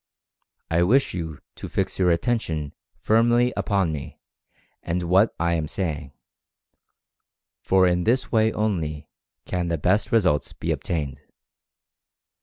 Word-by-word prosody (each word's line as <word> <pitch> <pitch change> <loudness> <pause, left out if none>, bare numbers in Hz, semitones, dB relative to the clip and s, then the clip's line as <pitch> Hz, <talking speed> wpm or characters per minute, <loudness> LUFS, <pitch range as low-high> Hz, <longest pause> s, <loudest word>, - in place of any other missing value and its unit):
I 85 +1 +3
wish 125 +11 +3
you 80 -4 -5 0.2
to - - -7
fix - - -2
your 90 -1 +3
attention 85 - -1 0.2
firmly 120 +2 +3
upon 100 -6 0
me 75 -2 -7 0.6
and 90 +1 -2
what 95 +5 +3
I 85 0 +1
am 80 -2 -1
saying, 75 -6 -4 1.5
for 95 -1 +3
in 90 0 +2
this 125 +5 +1
way 110 -1 +3
only 85 -10 -2 0.3
can 90 -1 -2
the 85 -1 -1
best 95 - +1
results 95 - +2
be - - -3
obtained. 70 -5 -3
90 Hz, 125 wpm, -24 LUFS, 80-110 Hz, 1.5 s, I